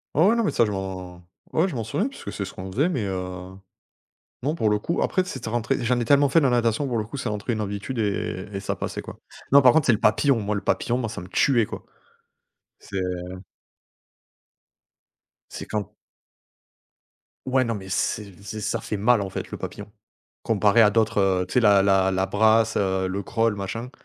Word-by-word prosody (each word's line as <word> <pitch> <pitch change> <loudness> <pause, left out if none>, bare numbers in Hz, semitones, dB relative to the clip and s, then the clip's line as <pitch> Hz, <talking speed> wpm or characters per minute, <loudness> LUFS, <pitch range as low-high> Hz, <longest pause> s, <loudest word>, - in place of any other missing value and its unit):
Ouais, 160 +5 +5
ouais, 230 - +4
non 230 - +1
mais - - +1
ça, 115 - +3
je 105 - -2
m'en 95 -2 -6 0.3
ouais, 170 +4 +3
je 165 - -6
m'en 115 -3 -3
souviens 205 - -1
puisque 275 - -9
c'est 100 - -3
ce 95 - -7
qu'on 95 +1 -7
faisait 145 - +1
mais 125 - -2
heu, 90 0 -5 0.9
non, 150 +5 -1
pour 110 -9 +1
le 105 0 +1
coup, 170 - -2
après 185 - +1
c'était 130 -9 -6
rentré. 120 +3 -1
J'en 120 +1 +1
ai 120 - -1
tellement 140 +2 +4
fait 165 - +5
de 150 - +1
la 130 - +4
natation, 120 +3 +1
pour 120 -2 -1
le 110 - 0
coup, 115 +7 -8
c'est 125 - -4
rentré 105 +2 -3
une 110 - -3
habitude 105 +5 -4
et 100 -2 -2
et 100 - -3
ça - - -2
passait, - - -4
quoi. - - -11 0.3
Non, 140 +1 +8
par 125 -2 +6
contre, 160 -4 +3
c'est - - +6
le 110 - +1
papillon, 125 +4 +3
moi, 105 0 -2
le 100 - -2
papillon, 120 +1 0
moi 120 -3 -2
ça - - -6
me 90 - -9
tuait, 115 +5 +2
quoi. - - -8 1.0
C'est 100 - -9 2.5
c'est - - -7
quand 105 -3 -3 1.6
Ouais, 130 0 +3
non 115 -2 -1
mais 95 -2 -7
c'est 100 0 -2
c'est 105 +1 -6
ça 115 - -1
fait 105 - -4
mal, 115 +3 +3
en 95 -2 -5
fait, - - -5
le - - -6
papillon, 105 0 -8 0.5
comparé 105 0 +3
à 105 - +7
d'autres, 110 0 +1
heu, 95 -2 +2
tu - - -8
sais 125 - +5
la 100 -3 +5
la 95 -1 +3
la 95 0 +1
brasse, 110 +2 +3
heu, 95 -1 0
le 100 +2 -3
crawl, 115 +1 0
machin. 115 +5 -5
110 Hz, 215 wpm, -24 LUFS, 100-125 Hz, 2.5 s, Non